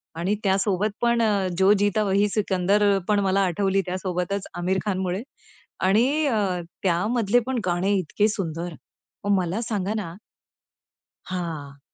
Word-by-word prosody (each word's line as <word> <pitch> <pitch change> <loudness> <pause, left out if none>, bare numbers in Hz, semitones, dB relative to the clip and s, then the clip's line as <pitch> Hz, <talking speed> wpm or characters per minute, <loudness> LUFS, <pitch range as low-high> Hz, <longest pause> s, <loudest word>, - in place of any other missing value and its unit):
आणि 180 +5 0
त्यासोबत 195 +1 +1
पण 235 0 +3
अ, 205 -4 +2
जो 190 +2 +5
जीता 205 +1 +2
वही 200 +1 +2
सिकंदर 200 0 +2
पण 210 -1 +3
मला 195 +1 +2
आठवली 195 +2 +1
त्यासोबतच 185 +1 -3
आमिर 180 +2 -1
खानमुळे. 190 -1 -1 0.6
आणि 250 +11 +3
अ, 200 -8 0 0.2
त्यामधले 210 +5 +2
पण 260 -2 0
गाणे 180 +3 +1
इतके 190 +4 +1
सुंदर, 175 -4 -3 0.5
मग 205 - +1
मला 185 +4 -1
सांगा 210 -3 -2
ना 180 -6 -5 1.1
हां. 160 -6 -5
195 Hz, 130 wpm, -24 LUFS, 180-210 Hz, 1.1 s, जो